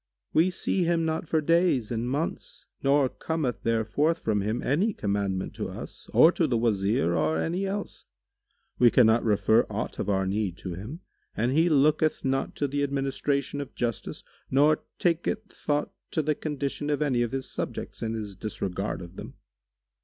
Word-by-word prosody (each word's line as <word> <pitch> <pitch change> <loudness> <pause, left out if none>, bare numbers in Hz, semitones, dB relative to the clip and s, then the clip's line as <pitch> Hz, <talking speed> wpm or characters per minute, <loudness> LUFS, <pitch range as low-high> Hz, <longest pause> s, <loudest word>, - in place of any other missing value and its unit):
We 165 +4 +4
see 185 0 0
him 170 -1 +1
not 160 +1 -2
for 160 0 +1
days 165 -8 +2
and 120 +1 -1
months 145 +5 -3 0.2
nor 140 0 +4
cometh 150 -2 -3
there 115 -1 +1
forth 150 +9 +1
from 110 -9 0
him 110 +4 -2
any 185 - +1
commandment 100 - -2
to - - -4
us - - -9
or 165 - +7
to 170 -3 +1
the 125 -4 +1
Wazir 100 -6 +1
or 80 -1 +1
any 180 - -1
else. 200 +1 -5 0.7
We 120 - +7
cannot 115 -1 +5
refer 110 +1 +3
aught - - -4
of - - -2
our 95 -1 +1
need 95 -2 -1
to 90 - -6
him 110 - -7 0.4
and 120 +3 +1
he 160 +5 +3
looketh 155 +1 +3
not 135 0 0
to 145 - 0
the 145 +1 -2
administration 140 0 -1
of 140 - -9
justice 120 -3 -3 0.3
nor 150 +3 +4 0.2
taketh 180 +5 0
thought 145 0 -1 0.2
to 155 - 0
the 150 +1 +2
condition 145 -1 -3
of 150 0 +1
any 130 -5 +1
of 120 -2 0
his 135 -1 -3
subjects, - - -5
in 115 0 -2
his 105 -3 -5
disregard 95 -1 -3
of 85 +2 -12
them. - - -8
135 Hz, 175 wpm, -27 LUFS, 110-155 Hz, 0.7 s, or